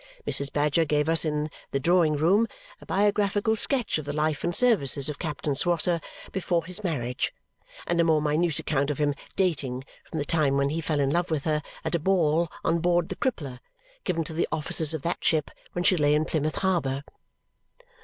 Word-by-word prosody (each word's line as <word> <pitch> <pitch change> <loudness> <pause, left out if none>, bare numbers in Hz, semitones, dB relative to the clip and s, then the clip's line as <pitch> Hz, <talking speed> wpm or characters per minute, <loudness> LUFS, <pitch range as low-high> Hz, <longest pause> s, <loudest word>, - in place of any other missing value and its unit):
Mrs. 140 0 +1
Badger 150 +2 +2
gave 150 -1 0
us 165 0 +4
in 150 0 -1 0.2
the 140 - -1
drawing 165 0 +3
room 190 +10 +3 0.3
a - - -14
biographical 205 +2 +1
sketch 240 - +1
of 155 - -7
the 145 - -3
life 155 -1 0
and 175 0 -1
services 150 - +3
of 145 - -6
Captain 150 -2 -2
Swosser 170 +3 +1 0.3
before 175 -3 -1
his 185 +4 -2
marriage 125 -9 -2 0.5
and 170 -1 +1
a - - +4
more 160 -2 +3
minute 155 +2 0
account 140 -1 -1
of 145 - -2
him 145 -1 +1 0.2
dating 140 -9 -1 0.3
from 160 - -5
the 145 - -1
time 145 -3 +2
when 140 0 +2
he 165 +2 -2
fell 155 -2 -1
in 135 0 +1
love 175 +3 0
with 155 -3 -1
her 155 -1 0 0.2
at - - -2
a 170 - +2
ball 170 -2 +2
on 165 +1 +1
board 175 0 +1
the - - -4
Crippler, 140 - -3 0.4
given 165 -1 -1
to 160 - -7
the 165 - 0
officers 160 0 +2
of 150 - -6
that 170 - -2
ship 155 -3 +1 0.2
when 175 - -2
she 185 - +4
lay 150 -2 +3
in 155 +1 +1
Plymouth 155 -1 -1
Harbour. 145 -8 0
160 Hz, 200 wpm, -26 LUFS, 145-175 Hz, 0.5 s, us